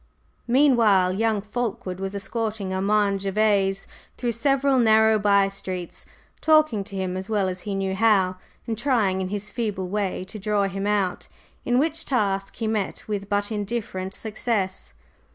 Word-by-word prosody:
Meanwhile 235 -8 +4
young 220 +1 +1
Fulkeward 210 -4 -4
was 195 +1 -4
escorting 215 -2 -3
Armand 200 +1 +1
Gervase 195 -1 +1 0.3
through 240 -2 -1
several 275 +3 +2
narrow 220 -1 +5
by 200 -1 +4
streets, 185 -3 -6 0.3
talking 310 -10 +4
to 200 -1 -7
him 185 -1 -2
as 185 +2 -5
well 205 -3 +1
as 185 0 -4
he 200 - -1
knew 195 -1 -1
how 190 -3 +3 0.3
and 230 - -2
trying 215 -6 +1
in 185 - -3
his 205 +1 -4
feeble 205 -6 -3
way 200 -2 -2
to 200 +3 -9
"draw 210 0 +1
him 195 +1 -2
out," 200 -3 0 0.4
in 245 0 +2
which 315 +4 +1
task 195 -6 -1
he 225 - -4
met 215 -3 -2
with 200 -2 -4
but 205 +1 0
indifferent 205 -3 -3
success. 215 -3 -3
205 Hz, 155 wpm, -24 LUFS, 195-225 Hz, 0.4 s, narrow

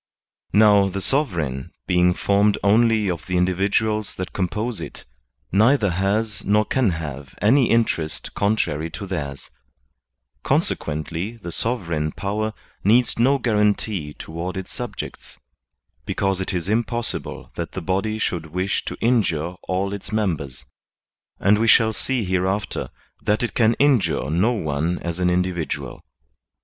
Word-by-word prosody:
Now, 105 -2 +5
the 100 +1 -3
sovereign, 85 - -1
being 90 0 +3
formed 100 +1 +2
only 110 +1 +4
of 85 -4 -3
the 90 -1 0
indi 90 +1 +2
viduals 105 +3 0
that 95 - -5
compose 105 +5 -2
it, - - -8 0.5
neither 110 +1 +4
has 100 +3 0
nor 105 +1 +3
can 130 -2 +2
have 75 -5 -5
any 120 +5 +4
interest 95 -9 0
contrary 85 -7 0
to 100 - -6
theirs; 70 -8 -5 0.9
consequently 85 +9 -1
the 90 -6 -7
sovereign 85 -10 -1
power 105 +2 -2 0.3
needs 115 +4 +3
no 135 +4 +4
guarantee 105 - 0
toward 85 +3 -5
its 95 - -6
subjects, - - -7 0.7
because 95 -1 0
it 95 - -2
is 90 -1 -2
impossible 115 +2 -2
that - - -5
the - - -3
body 100 +5 -1
should 85 -6 -2
wish 90 +5 -1
to - - -5
injure 90 -9 +1
all 95 +2 -1
its 100 - -7
members; 85 -12 -2 0.7
and 105 +1 +4
we 115 - +2
shall 110 -1 +5
see 125 +2 -1
hereafter 95 +2 -1 0.3
that 105 +3 +1
it 120 - -2
can 115 -1 +3
injure 130 - +2
no 95 +9 +3
one 80 -3 -1
as 85 +1 -3
an 90 -1 +2
individual. 90 -2 -2
100 Hz, 135 wpm, -22 LUFS, 85-110 Hz, 0.9 s, Now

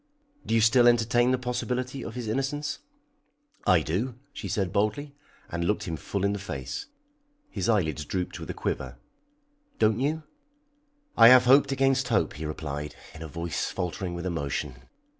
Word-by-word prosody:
"Do 115 - +1
you 115 - +4
still 120 +2 +5
entertain 120 +1 +4
the 130 - +3
possibility 125 +1 -3
of 115 - -7
his 120 -3 -4
innocence?" 135 +5 -2 0.9
"I 90 -3 +5
do," 110 - -2 0.2
she 100 - -6
said 95 -1 -1
boldly, 110 +8 0 0.4
and 85 0 -2
looked 105 +4 0
him 85 - -3
full 100 +4 -3
in 100 - +1
the 100 - -3
face. 70 -10 -5 0.6
His - - -2
eyelids 80 -9 +1
drooped 90 +2 -3
with - - -8
a - - -2
quiver. 65 -2 -3 0.8
"Don't 110 +1 +3
you?" 155 +4 -1 0.9
"I 115 - +9
have 125 +1 +8
hoped 140 +2 +6
against 135 -1 +2
hope," 105 -9 +1
he 75 +1 -5
replied, 75 -1 -5 0.2
in 80 - -11
a 80 - -5
voice 85 +2 -3
faltering 90 0 -3
with 85 +1 -5
emotion. 70 -6 -4
105 Hz, 165 wpm, -27 LUFS, 85-125 Hz, 0.9 s, I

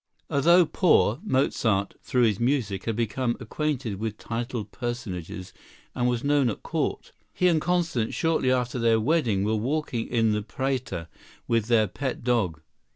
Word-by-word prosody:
] - - -42
Although 170 +5 +5
poor, 150 - +3
Mozart, 115 - +1
through 125 -1 +1
his 105 -4 +2
music, 120 -7 0
had 115 - -1
become 120 +2 -1
acquainted 125 -4 -3
with 110 -1 -3
titled 115 -3 -4
personages 95 -8 -5 0.4
and 125 -1 +1
was 120 -1 -1
known 140 -3 +3
at 105 - -5
court. - - -2 0.2
He 180 - +2
and 165 -3 +3
Constance, 170 -10 0
shortly 160 -6 +1
after 125 -1 0
their 115 -1 +3
wedding, 115 -6 +1
were 105 +2 +1
walking 125 0 -2
in 115 -2 +2
the 105 0 0
Prater 125 -7 -3 0.4
with 115 -2 +1
their 115 -2 +4
pet 130 +6 -4
dog. 105 -11 0
120 Hz, 155 wpm, -26 LUFS, 110-135 Hz, 0.4 s, Although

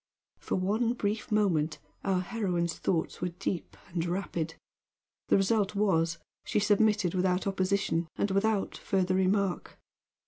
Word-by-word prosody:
For - - -2
one 215 +6 +1
brief 215 -2 -2
moment 170 -8 +2 0.3
our 190 -2 +1
heroine's 180 -5 -1
thoughts 165 -3 -1
were 180 - +1
deep 175 +1 -4
and 170 -1 -1
rapid; 170 -2 -2 0.7
the - - +5
result 200 +1 +1
was 170 -5 +2 0.3
she - - 0
submitted 205 -3 +3
without 185 0 +1
opposition 190 -3 0
and 200 - 0
without 200 +1 +1
further 185 -2 0
remark. 190 0 0
190 Hz, 130 wpm, -30 LUFS, 175-205 Hz, 0.7 s, the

